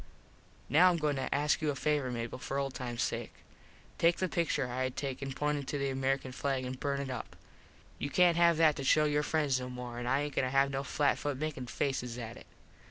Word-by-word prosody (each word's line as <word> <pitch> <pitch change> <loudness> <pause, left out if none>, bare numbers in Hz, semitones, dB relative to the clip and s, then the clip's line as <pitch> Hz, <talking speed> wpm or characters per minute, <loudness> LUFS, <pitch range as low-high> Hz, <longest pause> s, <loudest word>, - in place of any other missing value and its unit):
Now 170 +7 +6
Im 175 - +1
going 150 -3 0
to 130 - -3
ask 145 +1 +2
you 155 - +1
a 145 - -1
favor, 145 -1 0
Mable, 120 0 -4
for 135 - -3
old 135 -1 -1
times 120 -2 -3
sake. - - -3 0.6
Take 170 +1 +4
the 185 - 0
pictur 165 -6 0
I 125 +1 -3
had 130 - -5
taken 135 -1 -3
pointin 150 +1 -1
to 145 - -2
the 140 -1 -1
American 135 0 -1
flag 135 0 -2
an 125 - -3
burn 140 +1 -2
it 135 -2 -4
up. 125 - -6 0.6
You 140 - -2
cant 175 +1 +4
have 170 -1 +5
that 160 -2 +5
to 140 - -3
show 155 +3 +4
your 150 0 +2
friends 150 -4 +1
no 125 0 -5
more 125 -1 -6
an 120 - -4
I 135 +3 +2
aint 145 -1 -3
goin - - +3
to - - -1
have 135 +1 +3
no 135 0 -2
flat 140 +1 +1
foot 145 -2 -2
makin 145 -4 -4
faces 125 -3 -2
at 115 -1 -6
it. - - -13
140 Hz, 235 wpm, -32 LUFS, 130-150 Hz, 0.6 s, Now